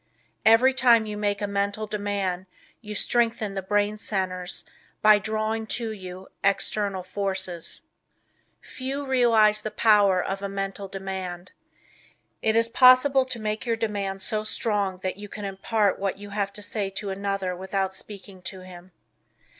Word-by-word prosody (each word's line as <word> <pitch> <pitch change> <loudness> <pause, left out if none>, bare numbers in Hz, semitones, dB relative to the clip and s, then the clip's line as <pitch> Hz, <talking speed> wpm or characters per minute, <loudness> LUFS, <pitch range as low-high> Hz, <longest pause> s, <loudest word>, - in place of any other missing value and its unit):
Every 235 +4 +6
time 240 -3 +5
you 210 -1 -5
make 205 0 -1
a - - 0
Mental 200 +1 -1
Demand 200 -3 -2 0.3
you 210 -2 -7
strengthen 225 -2 +1
the 195 - -3
brain 205 +2 0
centers 185 -4 -3 0.4
by 215 -1 +7
drawing 220 +1 -2
to 230 -2 -3
you 185 -2 -8 0.2
external 200 -1 0
forces. 190 -3 -2 0.8
Few 275 +2 -5
realize 225 -5 +4
the 215 - -3
power 205 -4 +4
of 195 +2 -2
a 200 - -3
Mental 195 0 -4
Demand. 190 -2 -6 0.9
It 220 0 +2
is 230 0 +5
possible 255 +3 +6
to 255 -2 -4
make 215 +2 -3
your 230 - +2
demand 200 -4 -2
so 215 +2 -1
strong 205 -3 0
that 185 0 -2
you 205 0 -9
can 205 0 -6
impart 200 +1 0
what 195 -1 -1
you 205 0 -10
have 200 -1 -1
to 210 - -6
say 205 -1 -2
to 195 +1 -4
another 195 -1 -2
without 190 +1 -2
speaking 195 -1 -9
to 185 +1 -7
him. 180 0 -13
205 Hz, 155 wpm, -25 LUFS, 190-220 Hz, 0.9 s, by